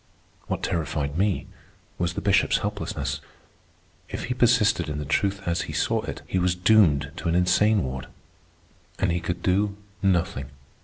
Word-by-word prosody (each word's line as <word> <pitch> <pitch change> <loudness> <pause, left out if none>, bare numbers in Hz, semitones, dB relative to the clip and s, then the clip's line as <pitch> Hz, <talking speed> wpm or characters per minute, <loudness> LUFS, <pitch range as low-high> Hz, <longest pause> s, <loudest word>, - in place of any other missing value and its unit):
What - - -3
terrified 75 -3 -1
me 95 +2 +1 0.5
was 85 0 -1
the - - -2
Bishop's 100 -2 +4
helplessness. - - -3 0.9
If - - -4
he 125 - -2
persisted 115 -9 +3
in 75 - -3
the 75 - -4
truth 100 +7 0
as 85 0 0
he - - -4
saw - - +1
it, - - -6
he 95 - -1
was 90 0 +2
doomed 90 -8 +4
to 85 - -2
an 85 - +1
insane 100 +4 +3
ward. 65 0 -5 0.9
And 95 -2 +1
he 85 - 0
could 85 +1 -4
do 100 +2 +1 0.2
nothing. 90 -8 +1
90 Hz, 160 wpm, -25 LUFS, 80-100 Hz, 0.9 s, Bishop's